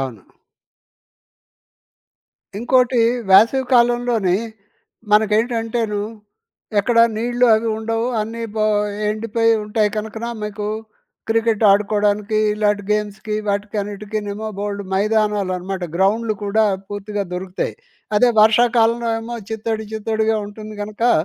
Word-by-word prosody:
అవును. 125 -8 -5 2.3
ఇంకోటి, 245 +2 +2 0.3
వేసవి 225 +7 +6
కాలంలోని 240 -6 +3 0.8
మనకేంటంటేను 220 0 +1 0.8
ఎక్కడా 230 +3 +4
నీళ్ళు 245 +2 +1
అవి 225 +1 0
ఉండవు, 225 +1 -1
అన్నీ 225 +2 -4
బో 215 -1 +1 0.4
ఎండిపోయింటాయి 215 -1 +1
కనకన, 220 +2 -4 0.2
మీకు 210 0 -4 0.6
క్రికెట్ 225 -1 +1
ఆడుకోవడానికి 210 +1 +1 0.2
ఇలాటి 210 -1 +1
గేమ్స్‌కి 210 0 -2
వాటికన్నిటికీనేమో 205 +1 -3
బోలెడు 205 0 -3
మైదానాలనమాట, 195 -3 0
గ్రౌండ్‍లు 215 +3 +1
కూడా 215 +2 +2 0.3
పూర్తిగా 205 0 -4
దొరుకుతాయి. 180 +1 -3 0.4
అదే 245 +3 +5
వర్షాకాలంలో 230 +1 +3
ఏమో 235 +1 -6
చిత్తడి, 220 0 -3
చిత్తడిగా 220 0 0
ఉంటుంది 215 +1 -9
గనకా, 215 +3 0
215 Hz, 90 wpm, -20 LUFS, 205-225 Hz, 2.3 s, వేసవి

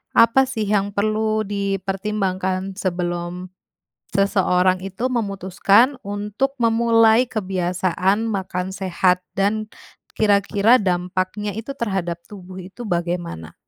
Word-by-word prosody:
apa 230 +3 +6
sih 225 -4 -3
yang 200 -1 +1
perlu 215 +1 +1
dipertimbangkan 195 -1 -2
sebelum 175 -1 -3 0.7
seseorang 185 -2 +2
itu 195 +7 -3
memutuskan 200 +4 +2
untuk 210 +7 -3
memulai 230 +1 +4
kebiasaan 185 0 0
makan 190 -3 -3
sehat, 185 -1 +1 0.2
dan 210 +2 0 0.5
kira-kira 205 +3 +3
dampaknya 185 +2 -1
itu 225 +7 -6
terhadap 185 -8 -3
tubuh 185 -2 -11
itu 210 +5 -9
bagaimana? 170 - -3
195 Hz, 95 wpm, -21 LUFS, 185-215 Hz, 0.7 s, apa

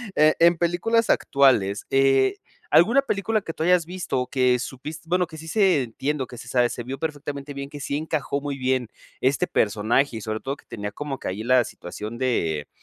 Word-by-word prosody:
Eh, 155 +1 +5
en 170 0 +5
películas 175 +7 +1
actuales, 110 -8 +3
eh, 135 -1 +3 0.3
alguna 230 +12 +5
película 215 -4 -1
que 165 - -6
tú 160 - -3
hayas 175 -1 +3
visto 165 -8 -3
que 125 -1 +2
supis 135 +5 -6
bueno, 180 +1 +1
que 160 -2 -11
sí 160 - -10
se 180 -5 +3
entiendo 135 +4 -2
o - - -23
que 120 - -11
se 120 - -10
sabe, 125 -2 +3
se 120 - -5
vio 130 +3 -5
perfectamente 145 -2 -5
bien 140 0 -6
que 145 0 -9
sí 140 +1 -2
encajó 150 -2 -2
muy 140 -1 -4
bien 130 -2 0 0.3
este 135 +2 +2
personaje 110 +4 +1
y - - -7
sobre 110 +1 -3
todo, 135 +2 -4
que - - -21
tenía 105 -1 -5
como 140 +3 -5
que - - -6
ahí 105 +4 -4
la 125 0 +4
situación 105 +3 -8
de, 80 - -1
140 Hz, 205 wpm, -24 LUFS, 125-160 Hz, 0.3 s, Eh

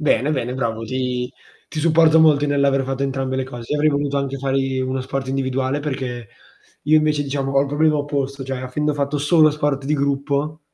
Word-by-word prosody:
Bene, 150 -2 +2
bene, 125 -4 -2
bravo, 115 -3 -2
ti 125 +1 -2 0.4
ti 155 - -5
supporto 160 0 +5
molto 150 -2 +4
nell'aver 140 -1 +2
fatto 135 +1 -3
entrambe 135 -1 -2
le 130 - 0
cose. 120 -2 -7
Io 150 - +1
avrei 155 +1 +3
voluto 140 -1 -1
anche 140 -1 -2
fare 135 0 -1
di 135 -1 0
uno 130 0 -2
sport 135 +1 -4
individuale, 130 +1 -1
perché 130 -5 -4 0.5
io 155 +2 +4
invece 150 -1 +2
diciamo 135 -1 -2
ho 135 - +4
il 140 - -2
problema 150 +2 +2
opposto, 140 -2 -3
cioè 135 0 -4
avendo 145 +4 -2
fatto 140 +1 -1
solo 155 +1 +4
sport 145 -2 -1
di 150 - +1
gruppo 140 +2 -1
140 Hz, 200 wpm, -21 LUFS, 130-145 Hz, 0.5 s, supporto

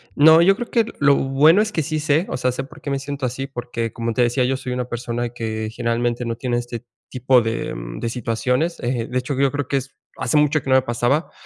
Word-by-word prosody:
No, 160 +3 +7
yo 195 +3 +5
creo 240 - -5
que 230 -2 +2
lo 140 0 +5
bueno 150 +8 +4
es 215 0 -1
que 160 -6 -1
sí 155 +1 -2
sé, 155 +3 +2
o - - -4
sea, 125 0 0
sé 135 +2 -4
por 155 +2 -15
qué 140 - -5
me 140 0 -1
siento 140 -1 -4
así, 130 +2 -3
porque, 120 -3 -4
como 115 -1 -2
te 125 - +1
decía 120 +2 +2
yo, 130 +1 0
soy 125 -1 -5
una 125 -1 -2
persona 120 0 -3
que 110 -2 -4
generalmente 120 +1 -1
no 115 0 -2
tiene 120 -1 -2
este 120 0 -5 0.2
tipo 125 -1 +3
de, 115 0 -3
mm, - - -7
de 115 - -1
situaciones, 125 +7 -1
eh, 120 -1 -2
de 130 - -2
hecho, 130 +2 -2
yo 140 -1 +3
creo 145 -3 -2
que 140 - +1
es 135 +1 -6 0.2
hace - - -1
mucho 150 0 +3
que - - -7
no 130 - +5
me 130 - +5
pasaba, 120 +6 0
125 Hz, 255 wpm, -21 LUFS, 120-145 Hz, 0.2 s, No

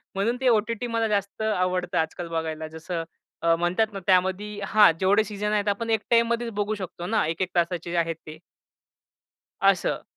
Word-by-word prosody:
म्हणून 225 +5 0
ते 260 - +2
ओ-टी-टी 230 +1 +1
मला 230 -1 0
जास्त 200 0 -2
आवडतं 185 -4 0
आजकाल 165 +2 -2
बघायला. 160 -1 -3
जसं 165 +2 -5 0.4
अ, 165 0 +4
म्हणतात 185 +6 0
ना, 195 - -4
त्यामध्ये 190 +3 +1
हां, 210 -4 +6
जेवढे 200 +3 +4
सीझन 210 0 -3
आहेत 210 -1 0
आपण 225 +3 -2
एक 220 -2 +2
टाईममध्येच 235 0 +2
बघू 210 +1 -1
शकतो 180 -3 -7
ना, 220 -3 +1
1-1 175 +3 -2
तासाचे 170 0 0
जे 175 - -1
आहेत 165 -1 0
ते. 155 - -8 1.2
असं. 195 -2 +2
195 Hz, 170 wpm, -25 LUFS, 175-215 Hz, 1.2 s, हां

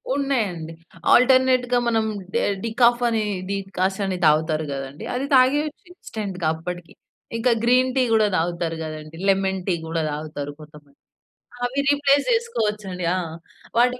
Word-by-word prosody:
ఉన్నాయండి. 205 - -1 0.4
ఆల్టర్‌నేట్‌గా 255 -1 +4
మనం 225 -1 +2 0.3
డె - - +3 0.2
డికాఫ్ 240 +1 +3
అని 225 -2 0 0.3
డికాసన్ 195 0 -1
తాగుతారు 155 +1 +2
గదండీ! 135 +2 -6
అది 260 +2 -1
తాగేయచ్చు 290 +4 +2
ఇన్‌స్టంట్‌గా 195 - -5
అప్పడికి. 175 +1 -7 0.4
ఇంక 245 +2 +1
గ్రీన్ 255 +2 +3
టీ 260 - +4
గూడా 215 -1 +4
తాగుతారు 170 0 -1
కదండీ! 155 0 -8
లెమన్ 190 -1 +1
టీ 180 - +2
కూడా 165 0 -1
తాగుతారు 145 -1 -5
కొంతమంది. 150 -2 -15 0.7
అవి 260 +3 -1
రీప్లేస్ 285 0 +3
జేసుకోవచ్చండి. 210 - -1
ఆ! - - 0 0.6
వాటి 250 +1 +3
200 Hz, 125 wpm, -23 LUFS, 165-250 Hz, 0.7 s, ఆల్టర్‌నేట్‌గా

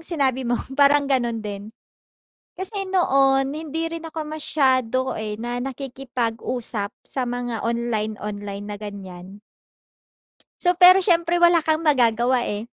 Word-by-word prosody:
sinabi 265 -7 -1
mo, 240 - +2 0.2
parang 285 +1 +4
ganun 240 -5 0
din. 205 0 -6 0.9
Kasi 390 +1 -4
noon 275 -7 +3
hindi 320 +1 -4
rin 330 0 -6
ako 315 0 -5
masyado, 260 -5 0
eh, 210 -1 -4
na 240 +2 -4
nakikipag-usap 245 -4 -3
sa 265 - -4
mga 245 -2 -3
online-online 210 -3 -3
na 205 0 -7
ganiyan. 195 -1 -9 1.2
So 355 0 +3
pero 365 +2 +8
siyempre 345 -2 +2
wala 345 -1 +5
kang 315 +1 0
magagawa, 245 -2 +3
eh, 210 +1 -4
255 Hz, 120 wpm, -22 LUFS, 220-310 Hz, 1.2 s, pero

